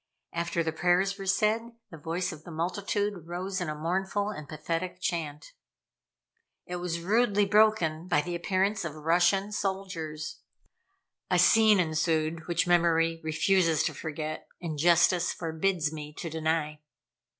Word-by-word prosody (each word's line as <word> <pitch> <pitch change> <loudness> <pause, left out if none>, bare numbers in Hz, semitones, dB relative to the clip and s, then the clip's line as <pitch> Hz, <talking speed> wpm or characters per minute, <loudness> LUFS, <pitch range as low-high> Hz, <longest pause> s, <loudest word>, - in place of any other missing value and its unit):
After 170 0 -1
the 160 - -1
prayers 180 +5 +1
were 195 - -6
said, 220 +4 +1 0.2
the 165 - -9
voice 170 +4 -2
of 155 -2 -10
the 175 - -11
multitude 185 +2 -2
rose 185 +2 -3
in 175 - -2
a 150 - -3
mournful 190 +6 -1
and 155 -8 -9
pathetic 165 +4 -3
chant. 160 -5 -4 1.1
It 180 - -5
was 175 -1 -3
rudely 205 +2 +2
broken 195 -6 +3
by 155 -5 +3
the 175 +3 -5
appearance 190 +4 0
of 165 -3 -4
the 155 - -11
Russian 180 +5 +2
soldiers. 190 -7 -4 0.9
A - - +3
scene 220 -3 +6
ensued 160 -1 0
which 170 -1 +1
memory 165 -2 +2
refuses 165 0 +2
to - - -1
forget, 155 0 -5
and 160 -4 -5
justice 175 +2 +4
forbids 165 -1 -1
me 150 -1 -7
to 165 - -6
deny. 160 -1 -1
170 Hz, 145 wpm, -28 LUFS, 160-195 Hz, 1.1 s, scene